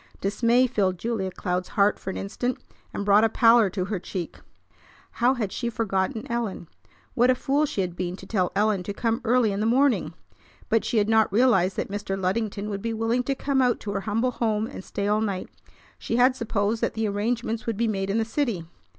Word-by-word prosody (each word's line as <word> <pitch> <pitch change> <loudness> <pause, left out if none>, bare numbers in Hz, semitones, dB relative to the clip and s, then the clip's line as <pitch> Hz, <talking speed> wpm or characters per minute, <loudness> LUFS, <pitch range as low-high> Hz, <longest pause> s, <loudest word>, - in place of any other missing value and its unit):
Dismay 230 +5 +2
filled 195 -7 0
Julia 220 -1 -2
Cloud's 180 0 -3
heart 200 0 +2
for - - -6
an - - -4
instant, 245 +5 -3 0.3
and 200 - -4
brought 205 +1 +5
a 225 - +4
pallor 230 -2 +5
to 185 -1 -3
her 200 -1 -3
cheek. 175 -1 -6 0.7
How 250 +2 +2
had 215 -6 -2
she 235 +3 -2
forgotten 220 0 -1
Ellen? 230 -7 -3 0.5
What 245 +1 +3
a 255 - +5
fool 285 +3 +1
she 200 - -2
had 180 -2 -3
been 180 0 -3
to 190 - -12
tell 185 -3 0
Ellen 210 -1 +2
to 200 +3 -6
come 230 +2 -1
early 240 -2 +3
in 200 - -2
the 215 - +1
morning! 265 +3 +2 0.5
But 225 - +2
she 235 - -1
had 210 -1 +3
not 220 -2 +3
realized 195 -5 +3
that - - -3
Mr. 205 -1 -3
Luddington 200 +2 -1
would 200 -1 -4
be 230 +1 -2
willing 225 +3 +1
to 275 - 0
come 270 0 0
out 250 -1 +2
to 205 - -4
her 200 -1 -2
humble 225 +5 0
home 220 -3 0
and 205 - -8
stay 200 +1 -3
all 210 +1 +2
night. 200 -4 -3 0.5
She - - -3
had 250 +2 +4
supposed 220 -2 -1
that - - -1
the 220 -1 0
arrangements 225 +2 -2
would 225 -3 -1
be 235 +1 +1
made 195 -2 -2
in 200 - +1
the 225 - +1
city. 230 - -2
220 Hz, 220 wpm, -25 LUFS, 195-235 Hz, 0.7 s, brought